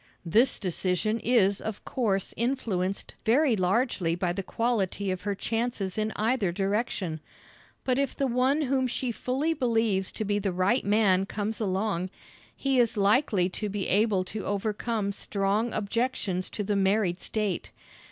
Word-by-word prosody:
This 225 +10 +3
decision 185 +3 0
is 210 -4 +3
of 220 -2 -5
course 200 -7 0
influenced 215 -6 -1
very 245 +2 +4
largely 185 -3 +1
by 175 0 -1
the 195 - -2
quality 200 -3 -1
of 185 - -3
her 205 -1 -2
chances 225 -2 -2
in 215 0 -1
either 220 -4 +1
direction, 195 -3 -1 0.6
but 255 0 +1
if 280 -2 0
the 275 - 0
one 260 +4 +2
whom 260 -1 +1
she 250 0 -2
fully 270 +8 -1
believes 225 -8 +1
to 215 - -3
be 205 0 +1
the 195 -1 -1
right 185 +8 +2
man 200 -2 +3
comes 210 +2 -3
along, 190 -2 -1 0.5
he 270 -2 +1
is 235 -2 +2
likely 205 -2 +3
to 210 +3 -3
be 200 -1 -2
able 205 -2 +3
to 205 +3 -6
overcome 210 +1 -1
strong 200 +3 -1
objections 210 -4 -1
to 210 - -3
the 205 +1 0
married 195 -2 +1
state. 210 -5 -2
210 Hz, 150 wpm, -28 LUFS, 195-235 Hz, 0.6 s, very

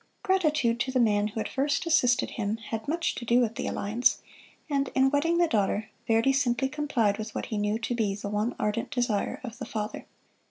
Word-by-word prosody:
Gratitude 305 - +2
to 260 - -1
the 255 - +1
man 210 -3 +3
who 220 +1 -5
had - - -2
first 280 +3 0
assisted 255 -7 +3
him 215 0 -2
had 225 -1 -6
much 330 +3 0
to - - -6
do 235 +1 +3
with 230 -3 +1
the - - -4
alliance; 225 +5 +1 0.5
and 280 -2 0
in 265 0 +4
wedding 330 +4 +2
the 345 0 +4
daughter, 210 -3 0 0.2
Verdi 230 +4 +3
simply 265 -1 +1
complied 255 -8 0
with 215 - -6
what - - -2
he 220 - -4
knew 210 +1 0
to 235 +1 -3
be 215 -4 0
the 200 0 -6
one 210 +3 -1
ardent 210 +2 -1
desire 240 -5 -1
of 235 -3 -7
the - - -4
father. 210 -1 -5
235 Hz, 210 wpm, -28 LUFS, 215-275 Hz, 0.5 s, in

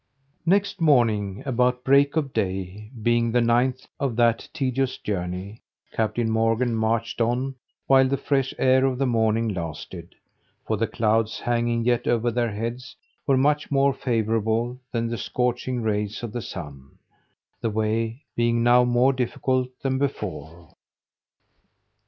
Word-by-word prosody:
Next 200 0 +2
morning, 110 -10 +2
about 125 -1 +1
break 140 +3 +4
of 145 -4 -1
day, 95 +2 -3
being 120 0 +2
the 120 - +3
ninth 120 +2 +1
of 135 -5 -1
that 115 -1 +2
tedious 130 -1 -1
journey, 95 +2 -4 0.3
Captain 115 +1 0
Morgan 115 +2 +1
marched 115 +1 -1
on 125 +4 0 0.3
while 135 -1 +5
the 140 +1 0
fresh 135 -2 0
air 130 0 +4
of 130 -2 +1
the 135 - +1
morning 115 -2 +1
lasted; 85 -6 -6 0.5
for 110 - 0
the 110 +2 0
clouds 110 0 0
hanging 120 -1 0
yet 120 -1 +1
over 120 0 +1
their 120 0 0
heads, 115 +5 -5 0.3
were 135 -2 +4
much 145 +2 +2
more 140 0 +3
favourable 115 0 -1
than 115 -1 -1
the 115 -1 -4
scorching 125 +2 -1
rays 105 0 -2
of 115 - -4
the 120 - -4
sun, 70 -9 -9 0.6
the 115 - 0
way 110 +4 -1
being 120 0 +1
now 120 +1 +6
more 125 +2 +3
difficult 130 0 -1
than 130 -1 0
before. 85 - -5
120 Hz, 140 wpm, -24 LUFS, 110-130 Hz, 0.6 s, now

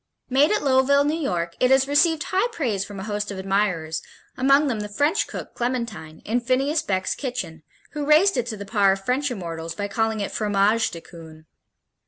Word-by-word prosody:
Made 280 +4 +4
at 425 - +1
Lowville, 275 +1 +4
New 295 - +1
York, 175 - -2
it 250 - +3
has 265 0 +4
received 300 +2 +3
high 380 +5 +1
praise 235 - -1
from 200 -1 -9
a - - -5
host 210 0 -3
of 200 - -5
admirers, 190 -5 -1 0.3
among 275 +3 +4
them 240 -6 -1
the 210 0 -5
French 290 +10 +1
cook, - - -8
Clementine, 235 -11 -4
in 235 +3 +1
Phineas 270 +6 +1
Beck's 190 -1 -1
Kitchen, 245 - -5 0.3
who 295 0 -4
raised 315 +5 +5
it 245 -2 -1
to 220 -3 -5
the 200 - -7
par 200 -2 +3
of 195 0 -8
French 270 +3 0
immortals 165 -7 -5
by 205 -1 -3
calling 220 +1 -1
it 200 - -3
Fromage 210 +1 +1
de 165 - -9
Coon. 160 -2 -13
225 Hz, 200 wpm, -23 LUFS, 195-275 Hz, 0.3 s, raised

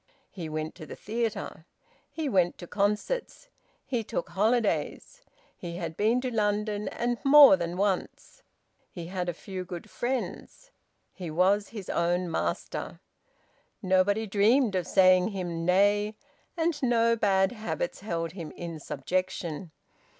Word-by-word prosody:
He 170 -5 -6
went 155 0 -4
to 155 -3 -11
the - - -8
theatre. 225 +1 -4 0.4
He 320 -2 -4
went 185 -8 +2
to 175 - -8
concerts. 210 - -2 0.4
He 240 -4 -2
took 175 - -4
holidays. 230 - 0 0.3
He 170 -1 -7
had 165 -2 -5
been 220 +6 +2
to 255 -1 -3
London, 210 -1 0
and 240 0 -2
more 280 -5 +9
than 175 -1 -4
once. 195 -1 -2 0.5
He 170 -2 -8
had 180 -2 -2
a - - -2
few 185 +1 -6
good 175 -1 -8
friends. 265 - -4 0.4
He 180 -3 -7
was 190 +6 +2
his 210 -5 -8
own 175 +1 0
master. 85 - -3 0.8
Nobody 190 +4 +2
dreamed 215 +4 +3
of 185 -2 -1
saying 185 -1 +5
him 175 -5 -4
nay, 205 +3 +3 0.4
and 325 -2 0
no 230 -2 +3
bad 195 -3 +2
habits 245 - -4
held 165 -5 -3
him 170 -3 -7
in 170 -2 -7
subjection. 170 +3 -3
195 Hz, 135 wpm, -28 LUFS, 175-225 Hz, 0.8 s, more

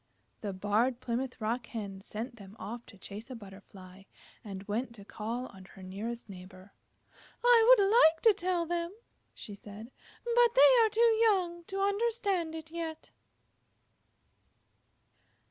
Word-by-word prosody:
The 205 - -3
Barred 210 +6 0
Plymouth 250 +1 -3
Rock 220 +1 -2
Hen 200 -4 -6
sent 230 +5 -6
them 200 -1 -13
off 235 +3 -7
to 200 - -14
chase 210 +5 -9
a 255 - -6
Butterfly, 195 -2 -13 0.4
and 195 -2 -7
went 230 +4 -3
to 200 -3 -13
call 230 +4 -4
on 190 -1 -14
her 190 0 -14
nearest 215 +6 -6
neighbor. 185 0 -12 0.7
"I 480 -2 +6
would 400 - +4
like 360 -7 +5
to 450 -2 +7
tell 355 -2 -1
them," 340 +1 -3 0.4
she 210 - -9
said, 210 +4 -11 0.3
"but 475 0 +3
they - - +7
are 440 - +3
too 450 +1 +3
young 365 -6 +2
to 390 +2 -4
understand 400 -5 0
it 320 0 -9
yet." 325 -2 -6
240 Hz, 145 wpm, -31 LUFS, -, 0.7 s, to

